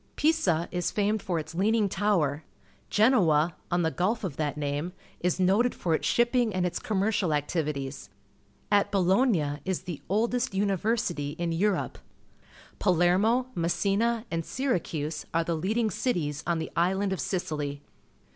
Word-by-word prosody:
EiscLis 180 - +1
famed 210 0 0
for 175 -3 -2
its 160 0 -5
Leaning 210 +4 +2
Tower. 180 -8 0 0.5
GerwOj 175 - +4 0.2
on 175 0 +1
the 160 - +1
gulf 215 +8 0
of 175 -8 -3
that 150 -1 -2
name, 145 +4 -2 0.3
is 180 +1 0
noted 200 +7 +3
for 170 - -1
its - - 0
shipping 240 -1 +2
and 180 -1 +1
its 180 0 -2
commercial 200 -5 0
activities. 145 -2 -3 0.6
At 205 0 +3
RnJngiin 185 - +2
is 190 -2 -2
the 175 -5 -6
oldest 235 +4 0
lyiiyersitj' 195 -6 0
in 170 -1 -1
Europe. 195 +4 0 0.8
PjQthKitw, 200 +8 +2
Mcssitm, 200 +7 +1
and 165 0 0
Syracm 165 - -2
e - - -26
are 165 - +3
the 170 0 -1
leading 215 +7 0
cities 150 - -1
on 170 -1 +1
the 160 - -4
island 190 +3 +1
of 190 - -4
Sicily. 150 -6 -3
180 Hz, 145 wpm, -28 LUFS, 160-210 Hz, 0.8 s, GerwOj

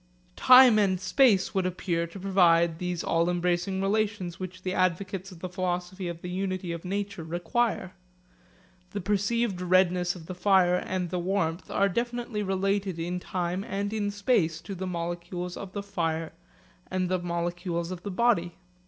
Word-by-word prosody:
Time 250 -3 +8
and 190 -3 +2
space 195 +1 +3
would 190 -2 +1
appear 170 -2 -2
to 170 +4 -10
provide 170 -4 +3
these 180 -1 -2
all 170 +1 +1
embracing 175 +2 0
relations 200 -3 -1
which 185 0 -7
the 185 - -2
advocates 185 +1 -1
of 170 -2 -13
the 185 - -3
philosophy 180 0 -3
of 170 -1 -6
the 180 - -4
unity 185 -1 -2
of 170 -1 -5
nature 200 -1 -3
require. 180 +4 -1 1.0
The 205 - -3
perceived 205 +1 0
redness 180 0 +2
of 170 -3 -10
the 185 - -6
fire 180 -1 +4
and 180 -1 -3
the 180 - -1
warmth 175 -2 -1
are 200 - +2
definitely 235 +1 -2
related 195 -1 0
in 175 +2 -3
time 180 +1 -2
and 200 +2 -3
in 210 -2 -1
space 200 -6 +1
to 200 - -7
the 190 0 -4
molecules 175 +1 -4
of 195 -1 -8
the 200 - -4
fire 165 -5 -2 0.6
and 185 -1 0
the 185 0 0
molecules 175 0 -3
of 180 -2 -6
the 205 - -5
body. 185 -5 +1
185 Hz, 165 wpm, -27 LUFS, 175-200 Hz, 1.0 s, Time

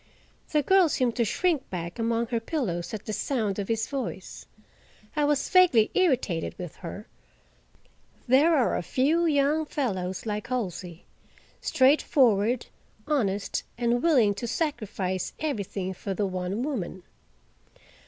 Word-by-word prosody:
The 300 -1 +2
girl 380 +1 +5
seemed 250 -4 0
to 235 - +2
shrink 320 - 0
back 175 +3 -5
among 230 +1 +1
her 235 -2 0
pillows 225 - -3
at 215 -1 -6
the 215 - -4
sound 215 -6 -1
of 200 - -3
his 225 -1 0
voice. 260 -9 -5 0.7
I 300 -1 +2
was 290 -1 +1
vaguely 340 -13 +5
irritated 255 - +1
with 175 -5 -7
her; - - -8 1.2
there 290 +7 +5
are 250 - +1
few 305 - +1
young 300 +1 +2
fellows 190 -11 -2
like 210 -1 -3
Halsey—straightforward, 235 - 0 0.4
honest, 205 -10 0 0.2
and 240 0 +1
willing 255 -11 +4
to 220 +4 -5
sacrifice 210 - -2
everything 200 -10 -3
for 195 +1 -5
the 205 - 0
one 185 +4 -3
woman. 195 - -4
235 Hz, 125 wpm, -27 LUFS, 195-285 Hz, 1.2 s, girl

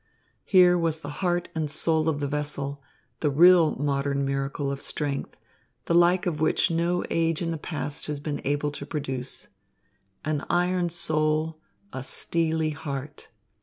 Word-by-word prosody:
Here 180 -2 +6
was 160 -1 -1
the 145 - -6
heart 175 -1 0
and 155 -2 -2
soul 160 +1 +2
of 145 -2 -2
the 145 - 0
vessel, 145 -1 -3 0.4
the 150 - +1
real 170 +2 +6
modern 140 0 0
miracle 140 +1 -2
of 140 0 -5
strength, 145 -2 -3 0.5
the - - 0
like 175 +2 +4
of 155 -4 -2
which 160 - +2
no 170 +2 +1
age 165 -1 +1
in 165 - -1
the 165 - -2
past 150 -2 -4
has 150 -1 -3
been 145 0 -4
able 145 +1 0
to 145 - -7
produce. 135 -4 -4 0.8
An 150 -1 -1
iron 180 0 +1
soul, 155 -1 0 0.3
a 130 - -4
steely 160 +2 0
heart. 145 -2 -6
155 Hz, 155 wpm, -26 LUFS, 145-165 Hz, 0.8 s, Here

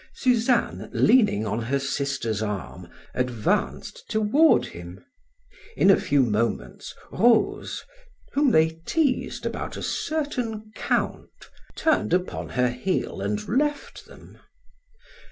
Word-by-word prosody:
Suzanne, 245 -1 +1
leaning 210 - +4
on 110 +2 -2
her 130 +5 0
sister's 135 -5 -2
arm, 105 -4 -5 0.2
advanced 125 -4 -1
toward 220 +9 +4
him. 85 +2 -10 0.7
In 195 - +6
a - - +7
few 140 -2 +3
moments, 105 - -2 0.2
Rose, 225 +3 +2 0.5
whom 285 0 +3
they 160 -5 +2
teased 295 -6 0
about - - -4
a - - -6
certain 245 -9 -3
Count, - - -1 0.5
turned 315 - +2
upon 180 0 -3
her 125 -1 +1
heel 125 - -2
and 105 +1 -2
left 290 +6 -2
them. - - -16
165 Hz, 110 wpm, -25 LUFS, -, 0.7 s, a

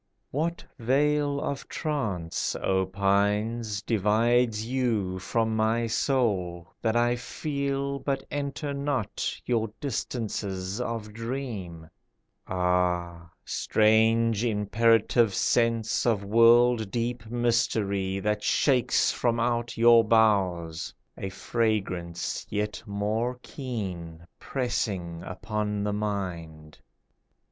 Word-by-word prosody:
What 165 +5 -2 0.2
veil 145 +3 +2
of 140 -1 -4
trance, 105 - -2
O 95 -1 0
pines, 100 +3 0
Divides 110 +2 +2
you 115 -7 -1
from 110 +3 0
my 110 +2 +1
soul, 100 -8 0
That 110 0 +1
I 120 +1 +3
feel 140 +1 -3
but 135 -1 -2
enter 145 0 -3
not 140 -5 -2
Your 115 -3 0
distances 105 -6 -3
of 115 -3 -4
dream? 110 -9 -5 0.6
Ah! 90 -2 0 0.2
strange, 110 +1 +3
imperative 115 0 +3
sense 115 0 +1
Of 110 -4 +2
world 115 +1 +5
deep 120 0 -3
mystery 110 -5 0
That 105 +1 -1
shakes 130 +1 +2
from 120 -1 0
out 120 0 -1
your 115 0 +7
boughs 95 -7 +2 0.2
A 95 - -5
fragrance 95 -6 -2
yet 105 0 -2
more 110 +5 -1
keen, 90 - -6
Pressing 100 -10 -2
upon 105 +2 -3
the 105 0 -1
mind. 85 -7 -4
110 Hz, 95 wpm, -27 LUFS, 95-120 Hz, 0.6 s, your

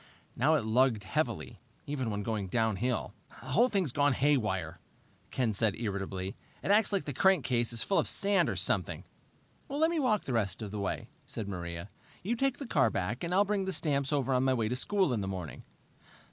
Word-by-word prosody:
Now 150 +6 +3
it 135 -8 0
lugged 115 -1 +3
heavily, - - -2 0.3
even 135 -5 -2
when 105 -1 -3
going 105 -2 -2
downhill. 110 +2 0 0.3
"The 130 - -9
whole 235 - +4
thing's 190 - +1
haywire," 140 -8 +1 0.5
Ken 120 -4 0
said 105 0 +1
irritably. 95 -3 -3 0.3
"It - - +1
acts 210 +1 +4
like 200 -2 +1
the 145 - -4
crankcase 130 -9 +2
is 115 - -1
full 195 - +2
of - - +1
sand 200 0 +3
or - - -2
something." - - 0 0.7
"Let 310 +4 +2
me 335 - 0
walk 225 -7 +2
the 130 - -3
rest 110 -1 -1
of 105 - -6
the 105 - -4
way," 100 - -3 0.2
said 110 -3 -5
Maria. 85 0 -5 0.3
"You 225 +6 0
take 270 +2 0
the 280 - -6
car 140 - +3
back, 105 - -3
and 170 - -2
I'll 195 +3 +4
bring 200 -1 0
the 190 - -1
stamps 145 -2 0
over 135 -3 +1
on 125 0 +2
my 130 -1 +3
way 115 -3 0
to 125 - -1
school 190 +1 +1
in 110 - -1
the 95 - -3
morning." 90 -5 -6
130 Hz, 200 wpm, -31 LUFS, -, 0.7 s, whole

